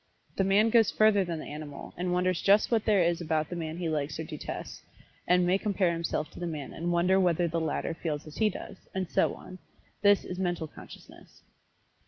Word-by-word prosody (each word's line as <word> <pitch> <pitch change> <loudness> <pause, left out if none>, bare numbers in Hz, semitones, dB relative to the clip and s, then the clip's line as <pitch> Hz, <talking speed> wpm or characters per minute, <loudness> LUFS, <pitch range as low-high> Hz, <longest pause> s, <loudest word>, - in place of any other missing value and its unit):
But - - -33
the 195 0 +2
man 210 +3 +4
goes 225 -3 +5
further 215 -2 +4
than 170 -2 -4
the 155 - -7
animal, 145 -1 -8
and 180 +1 -2
wonders 180 -1 +1
just 200 +4 +4
what 225 -2 +2
there 205 -5 +4
is 170 0 +1
about 155 -2 -1
the 175 - -5
man 160 -1 -4
he 175 -1 -2
likes 150 -2 -2
or - - -2
detests, 155 -2 -7 0.5
and 180 0 +4
may 185 +2 +2
compare 195 -4 +1
himself 165 -2 -2
to - - -11
the 175 - -3
man 150 -4 -5
and 170 +2 -2
wonder 180 +2 +3
whether 175 -2 +2
the 165 0 -1
latter 160 +1 -2
feels 155 -3 -4
as 155 - -11
he 220 -1 +3
does, 185 - -8 0.2
and 185 -2 -2
so - - +2
on 185 0 -11 0.4
this 205 -1 +4
is 180 - -6
Mental 175 -3 -1
Consciousness. - - -14
175 Hz, 220 wpm, -29 LUFS, 160-190 Hz, 0.5 s, goes